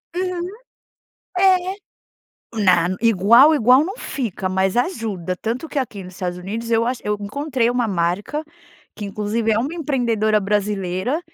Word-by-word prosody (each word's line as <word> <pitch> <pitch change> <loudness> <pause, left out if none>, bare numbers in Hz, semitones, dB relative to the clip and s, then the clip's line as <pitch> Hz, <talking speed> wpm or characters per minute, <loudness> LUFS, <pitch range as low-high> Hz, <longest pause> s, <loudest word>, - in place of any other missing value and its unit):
Uhum. 360 -1 -2 0.9
É. 375 0 +3 0.9
Na 175 -3 +4
igual 230 +7 +6
igual 255 +2 +5
não 390 +5 -5
fica, 220 - -4
mas 190 +1 0
ajuda. 215 - -2
Tanto 240 - -4
que 290 - -3
aqui 225 -7 -4
nos 180 0 -11
Estados 180 -1 -4
Unidos 220 +6 -5
eu 230 0 +2
acho 250 -1 -2
eu 210 0 0
encontrei 255 +3 -1
uma 245 -2 0
marca, 195 - -1 0.5
que 210 - -7
inclusive 210 +3 -1
é 215 - +2
uma 275 +8 -2
empreendedora 235 -9 +1
brasileira 205 - -1
225 Hz, 145 wpm, -21 LUFS, 195-275 Hz, 0.9 s, igual